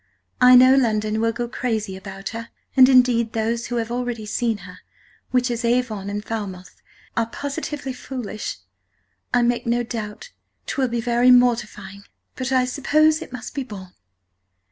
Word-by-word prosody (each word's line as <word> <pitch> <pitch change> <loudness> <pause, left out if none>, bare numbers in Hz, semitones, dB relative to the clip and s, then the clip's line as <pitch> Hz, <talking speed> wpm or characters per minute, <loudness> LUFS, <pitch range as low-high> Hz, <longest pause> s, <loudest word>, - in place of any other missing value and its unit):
I 250 0 +8
know 255 +1 +8
London 215 -4 +1
will 230 0 +2
go 240 +1 -4
Crazy 220 -5 -3
about 195 0 -7
her, 230 0 -7 0.3
and, 260 -1 +8
indeed, 245 -3 +4
those 230 +1 -1
who 245 - -4
have 230 -1 -2
allready 245 -3 -3
seen 230 0 0
her, 180 0 -12 0.5
which 250 -1 +1
is 235 +1 -3
Avon 235 -4 0
and 205 +1 -4
Falmouth, 195 -5 -6 0.3
are 230 -1 +1
positively 285 +1 -5
Foolish. 245 - -6 0.7
I 245 - +3
make 240 0 0
no 240 +1 +1
doubtt 225 - -6 0.3
'twill 265 -2 0
be 235 -1 -2
very 240 +1 +3
mortifying, 225 -5 +2 0.3
but 260 0 -3
I 255 -1 +3
suppose 310 +4 +2
it - - -9
must 250 0 -7
be 280 - -3
borne. 190 -7 -10
235 Hz, 160 wpm, -22 LUFS, 215-250 Hz, 0.7 s, I